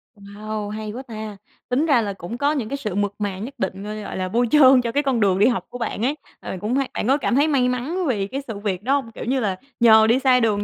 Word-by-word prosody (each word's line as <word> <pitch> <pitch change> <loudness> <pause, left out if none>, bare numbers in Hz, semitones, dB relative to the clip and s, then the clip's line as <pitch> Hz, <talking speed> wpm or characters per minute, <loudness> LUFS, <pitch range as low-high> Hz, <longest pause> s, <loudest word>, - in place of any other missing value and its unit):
Wow, 205 +1 -6
hay 215 0 -5
quá 255 +5 -7
ta, 215 -4 -7 0.3
tính 270 +6 +1
ra 275 -7 +4
là 205 -2 -3
cũng 190 +5 -7
có 285 +3 +1
những 260 -8 -2
cái 280 - -3
sự 210 -8 -4
mượt 205 0 0
mà 200 -2 -2
nhất 250 +6 -6
định, 190 -3 -3
ơ, 215 +1 -5
gọi 205 - -6
là, 185 0 -2
bôi 240 +5 +1
trơn 265 -4 +7
cho 235 - -3
cái 290 +4 +1
con 265 -4 +1
đường 195 -3 +2
đi 210 - +5
học 245 - 0
của 245 - -7
bạn 230 -1 -2
ấy, 290 +4 0 0.2
ờ, - - -6
cũng 220 +4 -1
hay 275 -1 0
bạn - - -2
có 270 +3 +4
cảm 255 -3 0
thấy 290 +3 +4
may 265 -5 +2
mắn 290 +9 -2
vì 205 -7 0
cái 270 +6 -4
sự 215 -4 -5
việc 200 -2 -3
đó 260 +4 +1
hông? 265 -5 -3
Kiểu - - -8
như 260 +3 0
là, 205 -6 -1 0.2
nhờ 220 -2 +7
đi 235 +3 +3
sai 260 -2 +4
đường 210 -3 +1
230 Hz, 295 wpm, -22 LUFS, 205-265 Hz, 0.3 s, trơn